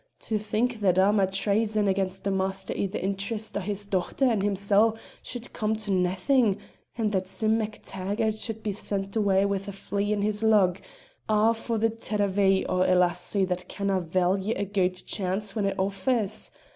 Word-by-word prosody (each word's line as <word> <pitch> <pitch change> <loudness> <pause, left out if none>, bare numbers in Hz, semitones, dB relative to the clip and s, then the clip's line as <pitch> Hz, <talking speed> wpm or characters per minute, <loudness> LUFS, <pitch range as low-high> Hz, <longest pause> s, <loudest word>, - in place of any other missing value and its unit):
To 215 -2 -1
think 225 +3 -1
that 185 -3 +2
a' 195 +2 +5
my 200 -3 +3
traison 210 +2 +1
against 190 -1 -1
the 200 - 0
master 190 0 -2
i' 200 - 0
the 195 - -4
interest 200 +3 -3
o' - - +1
his 205 +1 -4
dochter 200 +6 0
and 230 -6 +2
himsel' 205 +2 +2 0.2
should 245 -1 -8
come 215 0 0
to 215 -2 -3
naethin', 190 +5 +2 0.4
and 220 -3 0
that 190 -2 -1
Sim 215 +4 +1
MacTaggart 215 0 -2
should 220 -2 -5
be 210 - -1
sent 195 0 -4
awa' 200 -2 +3
wi' 200 0 +1
a - - -3
flea 200 +1 -2
in 205 -1 0
his 210 0 0
lug, 200 -5 +3 0.5
a' 215 +1 +4
for 230 0 -3
the 225 +1 +2
tirravee 200 -3 +1
o' 185 - +1
a 185 0 +4
lassie 180 +2 +1
that 180 0 -3
canna' 195 -2 -1
value 185 +5 0
a 200 - -1
guid 185 -2 0
chance 195 +1 -2
when 210 -3 0
it 195 - -2
offers! 200 +3 0
200 Hz, 185 wpm, -27 LUFS, 190-215 Hz, 0.5 s, a